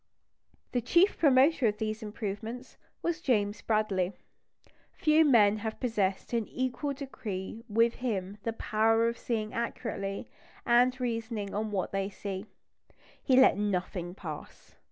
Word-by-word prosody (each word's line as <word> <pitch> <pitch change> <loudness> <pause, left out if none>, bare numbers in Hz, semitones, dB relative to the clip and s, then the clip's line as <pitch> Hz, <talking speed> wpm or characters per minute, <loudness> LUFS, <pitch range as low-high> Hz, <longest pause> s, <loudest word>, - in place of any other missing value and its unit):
The 245 - 0
chief 345 - +4
promoter 275 -2 +5
of 210 0 0
these 215 +1 -3
improvements 220 +3 -5 0.3
was 340 -1 -1
James 210 -6 +1
Bradley. 205 -4 0 0.8
Few 310 0 +4
men 215 -8 +5
have 220 +1 -5
possessed 210 -5 -1
in 230 -2 +1
an - - -20
equal 260 +3 -2
degree 225 -6 -6
with 230 +2 +3
him 205 -4 -2
the 230 +2 -2
power 225 +1 +2
of 235 0 -3
seeing 215 -3 -2
accurately, 215 -4 -3 0.4
and 250 +1 +4
reasoning 230 -4 -3
on 215 +1 -1
what 195 -4 -2
they 195 0 -1
see. 195 0 -6 0.7
He 260 - +3
let 260 -7 +6
nothing 180 -3 -2
pass. 155 -6 -9
220 Hz, 135 wpm, -30 LUFS, 205-250 Hz, 0.8 s, let